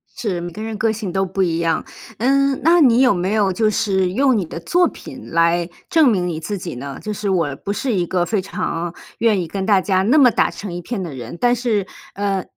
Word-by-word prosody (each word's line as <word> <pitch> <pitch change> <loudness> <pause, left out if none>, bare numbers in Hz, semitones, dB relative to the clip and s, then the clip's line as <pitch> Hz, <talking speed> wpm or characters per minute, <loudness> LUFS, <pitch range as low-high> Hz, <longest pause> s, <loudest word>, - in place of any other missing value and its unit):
是， 190 -7 -3
每 175 0 -5
个 210 - -8
人 220 -1 -4
个 225 +1 +1
性 215 -4 -4
都 190 +1 0
不 190 +1 -1
一 165 -2 0
样。 165 -1 0 0.3
嗯， 275 +3 +2
那 335 +2 +5
你 245 -2 +5
有 255 -4 +5
没 185 +2 -1
有 205 -3 +2
就 215 +3 +2
是 190 -4 0
用 260 +1 +3
你 190 - -1
的 165 - -7
作 350 - +2
品 - - -10
来 170 +1 +2 0.2
证 320 -5 +5
明 185 -6 +1
你 165 -3 -3
自 200 +6 -4
己 175 -5 -6
呢？ 135 +2 -7
就 215 - -4
是 205 0 -3
我 165 -7 0
不 200 - -5
是 245 +2 -2
一 180 -3 +1
个 175 0 0
非 205 0 0
常 170 -2 -4 0.3
愿 220 -3 +3
意 170 - -4
跟 190 +3 -4
大 200 -3 +4
家 190 -2 +1
那 255 +9 +3
么 255 -5 +6
打 - - +2
成 205 -3 -7
一 175 - -5
片 215 +3 -4
的 165 - -6
人。 125 +3 -8
但 245 0 +3
是， 225 -5 0 0.3
呃， 195 -2 -1
195 Hz, 265 characters per minute, -20 LUFS, 175-225 Hz, 0.3 s, 么